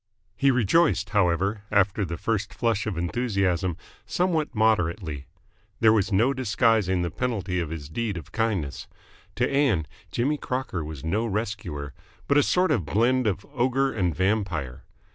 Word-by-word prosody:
He 140 - +3
rejoiced, 130 - +2
however, 100 +1 +1
after 100 0 +2
the 85 -2 -4
first 105 0 -2
flush 110 -3 0
of 100 -6 -3
enthusiasm, 95 -3 0 0.3
somewhat 170 -6 0
moderately. 85 -9 0 0.5
There 110 -1 +6
was 105 -1 +1
no 115 +8 +3
disguising 110 -7 +2
the 85 - -2
penalty 100 -8 -2
of 85 -3 -2
his 80 -3 -6
deed 105 +4 -3
of 80 -1 -9
kindness. 105 -10 -2 0.5
To - - +1
Ann 135 - +2 0.3
Jimmy 145 +5 0
Crocker 130 - -3
was 75 -2 -7
no 105 +8 0
rescuer, 100 -9 -4 0.3
but 140 - +3
a - - +6
sort 180 +4 +2
of 115 - +1
blend 120 +9 +2
of 95 -1 -1
ogre 130 +1 +1
and 90 -7 0
vampire. 90 - -1
105 Hz, 150 wpm, -25 LUFS, 85-120 Hz, 0.5 s, There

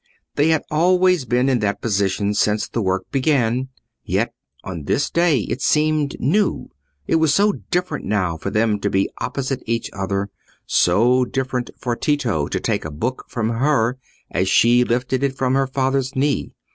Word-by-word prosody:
They 145 - +2
had 160 -1 +2
always 180 0 +3
been 125 +2 +1
in 130 -3 +2
that 105 -1 -1
position 100 -1 0
since 105 +1 +1
the 115 - -3
work 95 -1 -2
began, 130 -3 +1 0.3
yet - - -1 0.3
on 85 -6 -6
this 145 - 0
day 170 -7 +3
it 125 - -4
seemed 150 -1 +1
new; 195 - 0 0.3
it - - +2
was 160 -2 +3
so 205 +1 +4 0.2
different 180 +1 -1
now 95 -5 0
for 85 +4 -4
them 105 0 +1
to 100 - -1
be 95 0 0
opposite 135 -1 -3
each 115 0 -2
other; 100 0 -2 0.3
so 120 +8 +3
different 130 -1 -2
for 120 -2 -2
Tito 115 - 0
to - - -2
take - - -1
a 75 - -5
book 115 - -4
from 115 -2 -2
her, 125 0 +1 0.3
as 95 +1 0
she 120 +4 +5
lifted 125 +2 -1
it 135 -1 -1
from 130 -1 +1
her 135 0 +2
father's 135 0 -1
knee. 140 +2 0
125 Hz, 170 wpm, -21 LUFS, 105-140 Hz, 0.3 s, she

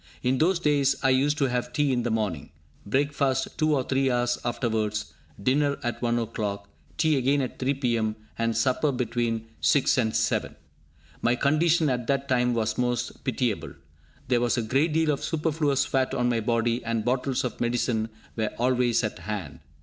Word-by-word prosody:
In 130 +1 +1
those 175 +3 +3
days 145 -4 +2
I 135 - +4
used 140 +3 +2
to 140 - +2
have 125 -1 -2
tea 140 +1 +2
in 125 - +1
the 120 - -1
morning, 105 -9 -2 0.4
breakfast 135 +2 0
two 155 -1 +3
or 130 - +1
three 135 +1 +1
hours 120 -1 +1
afterwards, 110 -3 -2 0.3
dinner 140 +6 +1
at 120 -1 -3
one 120 -1 +1
o'clock, 105 -3 -3 0.3
tea 155 -3 +3
again 135 +2 +2
at 130 -2 -4
3 135 +2 0
p.m., 115 -5 0 0.2
and 115 0 -1
supper 140 +3 +2
between 120 -3 -1
6 140 -2 +3
and 110 -2 0
7! - - 0 0.7
My 120 +1 +2
condition 155 +4 +2
at 125 -3 -1
that 140 0 0
time 125 -2 +2
was 110 0 -1
most 125 -1 -2
pitiable. - - -1 0.5
There 125 -2 +2
was 120 +1 +1
a 120 - 0
great 135 +9 +1
deal 160 0 +2
of 140 - -3
superfluous 150 -3 0
fat 135 -2 0
on 125 - +1
my 120 -1 +1
body, 115 +1 0
and 115 -1 -2
bottles 125 +1 0
of 125 - -4
medicine 120 -2 0 0.3
were 110 -2 0
always 125 -1 +2
at 105 - -3
hand. 95 -10 -5
125 Hz, 180 wpm, -26 LUFS, 115-140 Hz, 0.7 s, I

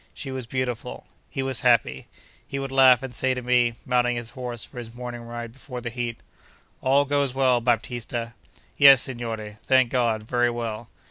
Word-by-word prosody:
She 135 - -6
was 130 -3 -5
beautiful. 125 -2 -4 0.2
He 135 - -3
was 135 -3 0
happy. 115 - +2 0.4
He 140 - -4
would 135 -1 -4
laugh 130 -2 +6
and 130 -2 -6
say 130 +2 0
to 125 - -5
me, 120 -1 +2
mounting 125 -1 +2
his 120 -1 -6
horse 125 -3 -5
for 125 - -10
his 115 -1 -9
morning 120 -1 -6
ride 115 0 -7
before 125 -1 -8
the 120 -1 -5
heat: 120 -1 -4 0.6
'All 140 +2 +3
goes 140 -2 0
well, 130 -2 +3
Baptista!' 120 0 -2 0.4
'Yes, 135 -2 +8
signore, 115 -4 -5
thank 130 -2 +3
God, 115 -4 +1
very 120 +2 +1
well. 115 -1 -5
120 Hz, 180 wpm, -24 LUFS, 115-130 Hz, 0.6 s, Yes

